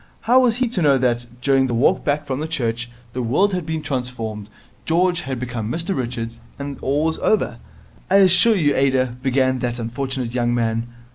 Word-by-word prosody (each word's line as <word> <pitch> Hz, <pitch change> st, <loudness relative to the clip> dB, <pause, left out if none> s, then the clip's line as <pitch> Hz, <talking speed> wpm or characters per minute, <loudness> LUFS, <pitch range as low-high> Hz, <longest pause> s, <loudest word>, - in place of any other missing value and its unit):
How 245 Hz, +3 st, +4 dB
was 245 Hz, -3 st, +3 dB
he 250 Hz, +1 st, +1 dB
to 210 Hz, -6 st, -2 dB
know 140 Hz, -3 st, +4 dB
that, 120 Hz, -2 st, 0 dB
during 135 Hz, 0 st, +3 dB
the 120 Hz, -, -1 dB
walk 120 Hz, -, +2 dB
back 145 Hz, +1 st, 0 dB
from 145 Hz, +3 st, -3 dB
church, 120 Hz, -6 st, -2 dB, 0.2 s
the 125 Hz, -, -2 dB
world 150 Hz, -, +2 dB
had 180 Hz, -4 st, -3 dB
been 160 Hz, -1 st, -3 dB
transformed, 115 Hz, -5 st, -4 dB, 0.3 s
George 175 Hz, +2 st, +1 dB
had 130 Hz, -4 st, -4 dB
become 120 Hz, -3 st, -4 dB
Mr 170 Hz, +6 st, -2 dB
Richards, 115 Hz, -3 st, -4 dB, 0.2 s
and 140 Hz, -1 st, -6 dB
all 145 Hz, +3 st, 0 dB
was 160 Hz, 0 st, 0 dB
over? 215 Hz, -, +1 dB, 0.5 s
'I 190 Hz, -, +3 dB
assure 195 Hz, +3 st, +6 dB
you, 150 Hz, -7 st, +2 dB
Ada 130 Hz, -2 st, +1 dB
' -, -, -25 dB
began 130 Hz, -1 st, +1 dB
that 120 Hz, -1 st, -2 dB
unfortunate 125 Hz, +1 st, -4 dB
young 120 Hz, -1 st, +1 dB
man. 115 Hz, 0 st, -1 dB
130 Hz, 195 wpm, -21 LUFS, 120-160 Hz, 0.5 s, assure